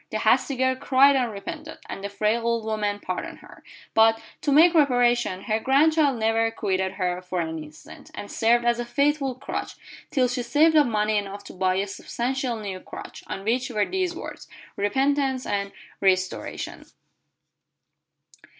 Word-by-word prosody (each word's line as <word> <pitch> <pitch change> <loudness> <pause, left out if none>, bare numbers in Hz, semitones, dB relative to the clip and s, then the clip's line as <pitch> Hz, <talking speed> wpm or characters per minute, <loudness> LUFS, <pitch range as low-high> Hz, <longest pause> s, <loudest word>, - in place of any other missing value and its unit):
The - - -2
hasty 275 - +2
girl 260 0 +1
cried 275 +1 +4
and 250 -3 +1
repented, 200 -1 -7
and 195 - -7
the 200 - -3
frail 215 +3 0
old 230 -1 0
woman 210 -2 -1
pardoned 185 -2 -5
her; - - -15 0.3
but, 225 0 +5 0.2
to 290 - 0
make 330 +5 +6
reparation, 245 - +2
her 215 0 0
grandchild 285 +2 +3
never 225 0 +2
quitted 190 -4 -1
her 180 -2 -2
for 180 0 -4
an 160 -2 -3
instant, 150 0 -14
and 205 - -7
served 235 +1 +2
as 240 0 +2
a - - -1
faithful 280 +1 0
crutch, 270 +2 -5 0.3
till 260 -3 +2
she 245 0 -2
saved 305 +6 +3
up 295 -3 +6
money 215 -1 +1
enough 200 0 -7
to - - -11
buy 185 0 +1
a 195 +1 0
substantial 245 +5 -3
new 200 -3 -5
crutch, - - -10
on 195 - -5
which 245 +4 0
were 210 -4 +1
these 370 -2 -2
words, - - -8 0.3
"Repentance 265 +5 0
and 200 -1 -2 0.3
restoration." 185 -1 -1
230 Hz, 165 wpm, -25 LUFS, 200-265 Hz, 0.3 s, make